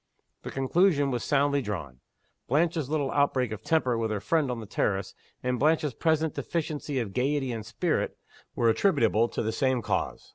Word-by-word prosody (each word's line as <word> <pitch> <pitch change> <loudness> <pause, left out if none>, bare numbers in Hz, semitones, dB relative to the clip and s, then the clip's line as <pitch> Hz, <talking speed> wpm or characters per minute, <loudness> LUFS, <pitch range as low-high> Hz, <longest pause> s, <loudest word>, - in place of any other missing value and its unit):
The - - -7
conclusion 145 +1 +2
was 120 -2 -2
soundly 140 0 +2
drawn. 80 - -5 0.5
Blanche's 155 0 +1
little 145 -3 0
outbreak 130 -4 +1
of 110 - -5
temper 130 -8 +1
with 110 -1 -1
her 105 -1 -1
friend 155 +5 +1
on 125 -2 -3
the 110 - -7
terrace, 100 -2 -1 0.3
and 125 -1 0
Blanche's 150 -1 +2
present 160 +3 +1
deficiency 150 -4 -3
of 110 -6 -2
gayety 135 +1 0
and 115 -2 -4
spirit, - - -1 0.4
were 115 - +2
attributable 115 - +3
to - - -3
the 110 - -1
same 130 0 0
cause. - - -2
130 Hz, 175 wpm, -28 LUFS, 115-150 Hz, 0.5 s, attributable